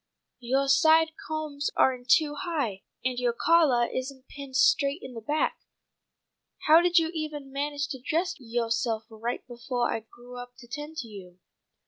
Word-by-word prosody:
Yoah 260 +3 +1
side 315 +4 +5 0.2
combs 305 -2 -3
are 265 - +4
in 245 -1 -11
too 295 +3 +4
high, 290 - -2 0.2
and 255 -1 0
yoah 245 -1 +1
collah 295 -8 +4
isn't 260 0 -5
pinned 275 -2 -9
straight 280 +3 +3
in 260 - -8
the 230 - -7
back. 295 +7 0 1.1
How 320 +2 +8
did 355 0 +3
you 325 -1 +4
evah 310 -2 -4
manage 285 +1 -3
to 265 -3 -6
dress 335 +7 0
yoahself 230 -1 -1
right 230 +2 -4
befoah 240 0 -2
I - - -1
grew 240 +3 -13
up 245 0 -10
to 245 - -14
tend 295 +5 -7
to 235 - -10
you?" 185 -4 -11
265 Hz, 165 wpm, -27 LUFS, 240-305 Hz, 1.1 s, How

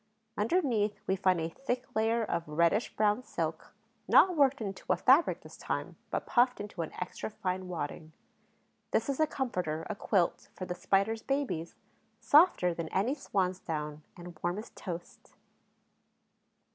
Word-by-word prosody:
Underneath, 225 - +1
we 190 - +1
find 185 -2 +2
a 160 - -1
thick 250 +6 -3
layer 225 +1 +2
of 170 -6 -2
reddish 170 +8 +1
brown 210 +2 +2
silk, - - -4 0.4
not 365 -2 +6
worked 280 -2 +4
into 195 -4 -4
a - - +3
fabric 275 +6 +4
this - - -12
time, - - -3
but - - -2
puffed 250 0 +3
into 205 -4 -5
an 160 - -4
extra 180 +3 -5
fine 185 -3 -3
wadding. 160 -2 -5 0.8
This - - 0
is 275 - -1
a 310 - +4
comforter, 180 - -2
a - - -3
quilt, 190 -4 0
for 185 - -5
the 180 - -3
Spider's 200 +5 +1
babies, 265 - -2 0.4
softer 290 - +5
than 165 -1 -4
any 210 +8 +1
swan's 185 -9 -1
down 150 -3 -4 0.2
and 175 -2 -10
warm 175 +2 -1
as 215 - -7
toast. 175 -2 -8
195 Hz, 155 wpm, -31 LUFS, 175-245 Hz, 0.8 s, not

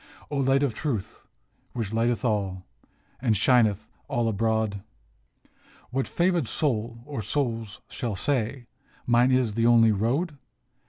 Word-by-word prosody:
O 145 - -1
Light 135 +1 +3
of 135 -5 +1
Truth, 120 -10 -4 0.5
which 110 -4 -3
lighteneth 120 +2 +1
all, 95 -5 -1 0.6
And 115 -5 +2
shineth 110 -3 +3 0.2
all 120 -1 0
abroad, 110 -1 0 1.1
What 130 +1 -1
favored 175 -6 +1
soul 115 -5 -2
or 140 -5 -4
souls 115 -2 -2
shall 115 -4 -4
say, 125 +1 -1 0.2
" - - -33
Mine 120 +2 +4
is 130 -4 +2
the 115 +2 +2
only 115 -2 +6
road? 135 - -1
115 Hz, 130 wpm, -26 LUFS, 110-135 Hz, 1.1 s, only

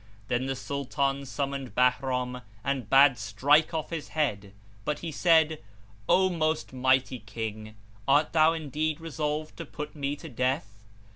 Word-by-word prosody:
Then 125 +2 0
the 135 - -1
Sultan 140 +1 -2
summoned 135 -4 -4
Bahram 125 0 +1 0.2
and 135 -6 -2
bade 135 -3 +6
strike 135 +9 +3
off 160 -1 -3
his 165 -3 -4
head; 105 -10 0 0.3
but 150 +6 -1
he 165 - -3
said, 160 -1 +3 0.5
"O 190 0 +5
most 160 -5 -1
mighty 130 0 +2
King, 110 0 -6 0.3
art 145 +3 +3
thou 160 0 +5
indeed 155 0 -2
resolved 155 -1 -3
to 170 - -5
put 150 +1 -7
me 145 -1 -2
to 160 - -10
death?" 125 -6 -2
140 Hz, 145 wpm, -28 LUFS, 125-155 Hz, 0.5 s, bade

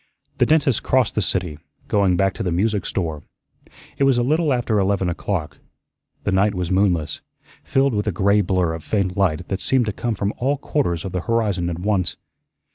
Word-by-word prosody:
The - - +4
dentist 145 -6 +3
crossed 130 -4 +2
the 105 - 0
city, 90 -5 -2 0.3
going 95 -3 +2
back 95 +1 +2
to - - -7
the 90 - -1
music 105 +4 0
store. 80 -5 -3 0.8
It - - +3
was 135 -2 +4
a 120 - +2
little 155 +4 +1
after 120 -4 +1
eleven 95 -2 +1
o'clock. 85 -2 -3 0.6
The 100 - 0
night 100 +2 +2
was 90 -1 -2
moonless, 90 -5 +1 0.4
filled 135 -1 +1
with 105 0 -1
a - - +2
gray 100 +4 +3
blur 90 -3 0
of 80 -1 -6
faint 100 -4 -1
light 90 -4 0
that 95 - -2
seemed 130 +2 +2
to 105 - -2
come 115 +3 -2
from 100 +1 -2
all 135 +3 0
quarters 95 - -1
of 95 - -4
the 90 - -2
horizon 105 -6 0
at 85 - -4
once. 95 -1 -1
100 Hz, 200 wpm, -21 LUFS, 90-115 Hz, 0.8 s, The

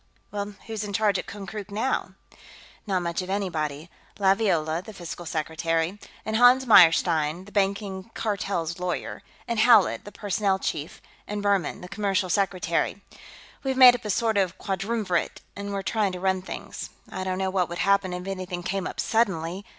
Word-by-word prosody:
"Well, 205 0 -4
who's 220 -2 -4
in 205 -1 -5
charge 210 -1 +2
at - - -7
Konkrook, 205 0 -7
now?" 220 +6 -2 0.7
"Not 185 -3 0
much 170 +1 -2
of 185 - -7
anybody. 160 -6 -2 0.3
Laviola, 190 -5 +2
the 220 - -10
Fiscal 175 -1 -7
Secretary, 165 +4 -1 0.3
and 220 +1 0
Hans 250 +2 +6
Meyerstein, 170 -4 +5
the 205 - -14
Banking 195 0 -1
Cartel's 195 -5 -2
lawyer, 180 -1 -3 0.3
and 235 -2 -1
Howlett, 220 -3 +5
the 205 - -10
Personnel 200 -1 0
Chief, 150 -4 -4 0.2
and 205 0 -4
Buhrmann, 200 -6 +1
the 180 - -8
Commercial 195 -2 -1
Secretary, 185 -1 0 0.6
have 265 -1 -1
made 255 -2 +10
up 245 0 -5
a 210 - -5
sort 220 +1 +2
of 190 -2 0
quadrumvirate 195 -1 -2
and 200 0 -5
are 195 -1 -3
trying 210 -3 0
to 180 - -5
run 190 0 +1
things. 185 - -7 0.2
I 185 - -4
don't 185 0 -2
know 190 0 -1
what 180 -3 +1
would 175 - -5
happen 200 -1 +3
if 180 0 -5
anything 185 -2 -4
came 190 +1 -2
up - - -7
suddenly...." 190 -5 0
195 Hz, 170 wpm, -26 LUFS, 180-205 Hz, 0.7 s, made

